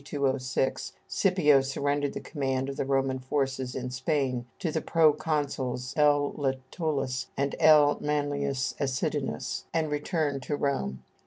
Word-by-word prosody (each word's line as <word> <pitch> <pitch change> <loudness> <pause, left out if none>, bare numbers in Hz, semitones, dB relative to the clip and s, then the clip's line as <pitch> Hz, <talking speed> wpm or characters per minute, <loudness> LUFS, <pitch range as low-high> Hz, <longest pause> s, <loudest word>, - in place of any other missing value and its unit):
206, 135 -1 -1
Scipio 170 -8 +4
surrendered 140 +1 -1
the - - -4
command 135 -3 -2
of 135 - -4
the - - -2
Roman 135 -1 +1
forces 130 -1 -2
in 125 -1 -4
Spain 130 -2 -1
to 165 - -2
the 160 - -1
proconsuls 145 -5 +1
L. 145 -1 +3
Lentulus 135 -1 -2
and 140 0 0
L. 150 -2 +6
Manlius 145 -2 -1
Acidinus, 130 -2 -2
and 160 -2 0
returned 150 -2 -1
to 145 +3 -2
Rome. 65 - -2
140 Hz, 130 wpm, -28 LUFS, 130-150 Hz, -, L